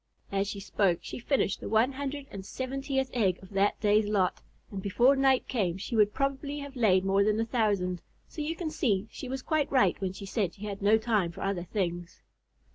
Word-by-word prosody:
As 195 0 0
she 200 - -4
spoke, 195 -3 +1
she - - -6
finished 250 -4 0
the - - -6
one 225 +5 +3
hundred 280 +1 -4
and 195 -1 -7
seventeenth 265 +4 -3
egg 195 -7 +2
of 190 - -14
that 200 +1 +1
day's 210 0 +3
lot, 195 -3 +1 0.3
and 195 -2 -5
before 235 +8 +4
night 270 -1 +3
came 190 -8 0
she 210 +4 -4
would 210 -2 +4
probably 275 +2 -2
have 280 -1 -7
laid 190 -6 +3
more 195 +1 +3
than 215 +1 +1
a 225 - +1
thousand, 205 -7 0 0.3
so 310 - -7
you 310 +2 -2
can 330 -2 -4
see 210 -8 0
she 260 - -7
was 265 0 -4
quite 310 -3 0
right 245 -9 +3
when 190 -1 -2
she 195 - -8
said 195 -3 -1
she 210 - -8
had 200 -1 -5
no 210 +2 +5
time 215 -6 0
for - - -10
other 195 -3 -2
things. 175 -3 -3
210 Hz, 215 wpm, -29 LUFS, 195-265 Hz, 0.3 s, no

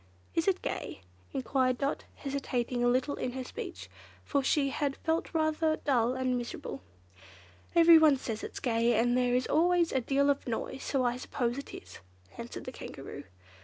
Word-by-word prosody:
"Is 330 +2 0
it 375 -1 +1
gay?" - - -4 0.3
enquired 255 0 +1
Dot, 280 +2 -2
hesitating 255 -3 -2
a - - +4
little 255 +4 +2
in 250 - -3
her 260 0 -4
speech, - - -7 0.4
for 280 -2 +1
she 275 +1 +2
had 280 -2 -1
felt 325 0 -1
rather 315 -1 +1
dull 250 -4 +1
and 255 -1 0
miserable. 240 - -6 0.3
"Well, 95 - -25 0.5
everyone 325 -4 +7
says 225 -4 -5
it's - - -6
gay, 235 -1 +2
and 240 +2 +3
there 250 -1 +2
is 250 0 +1
always 345 +1 +3
a 265 - +1
deal 280 +3 +3
of 280 - -3
noise, 245 +3 -3
so 265 -3 0
I 245 0 +1
suppose 250 0 -2
it 280 - -9
is," 90 0 -11 0.4
answered - - -7
the - - -5
Kankaroo. - - -8
265 Hz, 175 wpm, -30 LUFS, 245-295 Hz, 0.5 s, everyone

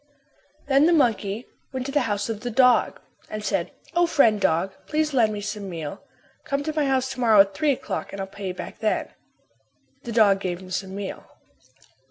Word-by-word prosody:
Then 280 +2 +4
the 345 - +4
monkey 225 -6 +1 0.3
went 260 -1 -4
to 275 - -4
the 290 - +2
house 205 -1 -1
of 225 -2 -3
the 245 - -4
dog 250 +1 +3 0.3
and 215 0 -5
said, - - 0 0.2
"O, 345 0 +3
friend 225 -10 +3
dog, 190 +1 +1
please 310 -1 0
lend 230 -5 +3
me 205 -1 -4
some 210 -1 -5
meal. 160 -4 -6 0.4
Come 280 +1 -2
to 310 +1 -3
my 300 -2 +1
house 265 -1 +1
to - - -7
morrow 220 -4 +7
at 195 0 +1
three 290 +7 +2
o'clock - - -5
and 195 - -7
I'll 195 - -2
pay 195 0 -7
you 185 - -2
back - - -8
then." 215 - 0 0.9
The 240 - -6
dog 210 -4 +4
gave 180 -2 -3
him 185 -1 -12
some 190 0 -3
meal. 200 -1 -6
215 Hz, 205 wpm, -24 LUFS, 195-270 Hz, 0.9 s, morrow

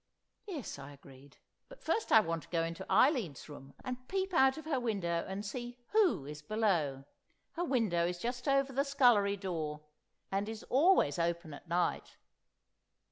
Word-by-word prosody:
"Yes," 300 - -6
I 140 +1 -9
agreed. 140 0 -16 0.3
"But - - -14
first 450 - -1
I 220 - +8
want 165 -4 -2
to - - -17
go 165 -2 0
into 165 +3 -5
Eileen's 235 - +2
room, 140 -2 -12
and 255 0 -5
peep 380 -1 -2
out 265 -3 +4
of 315 - -8
her 295 -5 0
window 190 -8 -1
and 195 +2 -5
see 240 +3 -6
who 400 - +3
is 150 +1 -8
below. 165 -8 0 0.5
Her 345 - -3
window 215 - +1
is 180 0 -3
just 245 +6 -4
over 275 -1 +2
the 275 +2 +2
scullery 245 -8 +3
door, 160 -6 -4 0.5
and 200 +2 -1
is 220 0 -7
always 275 - +4
open 170 -2 -1
at 145 - -12
night. 175 +1 -1
200 Hz, 170 wpm, -33 LUFS, 165-265 Hz, 0.5 s, I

